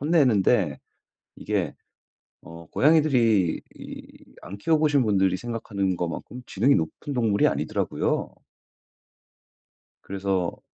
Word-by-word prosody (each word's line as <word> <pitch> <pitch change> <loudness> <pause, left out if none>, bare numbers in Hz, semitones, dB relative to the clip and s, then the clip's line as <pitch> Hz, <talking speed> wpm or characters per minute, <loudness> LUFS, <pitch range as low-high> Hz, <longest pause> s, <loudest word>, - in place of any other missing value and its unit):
혼내는데 140 - +2 0.6
이게 - - -2 0.7
어 85 0 -12
고양이들이 125 - +3
이 - - -11 0.2
안 95 - -8
키워보신 150 +2 +2
분들이 95 -3 +2
생각하는 100 -4 -3
것만큼 90 +9 -5
지능이 125 +8 +2
높은 80 - -3
동물이 110 -5 +2
아니더라고요. - - -1 1.7
그래서 95 -2 -2
105 Hz, 250 characters per minute, -25 LUFS, 95-135 Hz, 1.7 s, 고양이들이